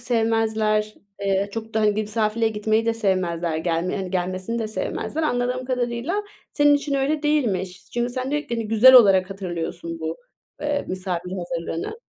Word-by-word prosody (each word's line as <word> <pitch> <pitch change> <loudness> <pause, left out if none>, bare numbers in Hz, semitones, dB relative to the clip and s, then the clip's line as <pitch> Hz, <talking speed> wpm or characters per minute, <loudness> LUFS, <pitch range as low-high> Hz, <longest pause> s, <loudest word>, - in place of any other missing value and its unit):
sevmezler. 220 -3 +1 0.3
Eee, 195 0 +1
çok 225 -1 -6
da, 220 - +2
hani, 210 -1 +2
bir - - +1
misafirliğe 220 +1 0
gitmeyi 220 +1 0
de 230 - +2
sevmezler. 175 -6 0
Gelme 170 +3 -1
hani, 190 -2 -4
gelmesini 185 +5 -2
de 220 - -2
sevmezler. 300 +7 -3
Anladığım 250 -2 0
kadarıyla 250 +9 -1 0.3
senin 290 -1 +5
için 285 0 -1
öyle 285 +3 0
değilmiş. 195 -12 -1
Çünkü 240 0 -1
sen 255 +1 -3
diyo 295 +1 +1
ki, 240 -5 -5
hani, 225 -2 -3
güzel 235 +4 +7
olarak 195 -6 +7
hatırlıyorsun 175 -3 -5
bu, 160 +1 -3 0.4
eee, 290 -1 -1
misafir 180 -1 -3
hazırlığını. 175 - -4
215 Hz, 165 wpm, -23 LUFS, 185-245 Hz, 0.4 s, güzel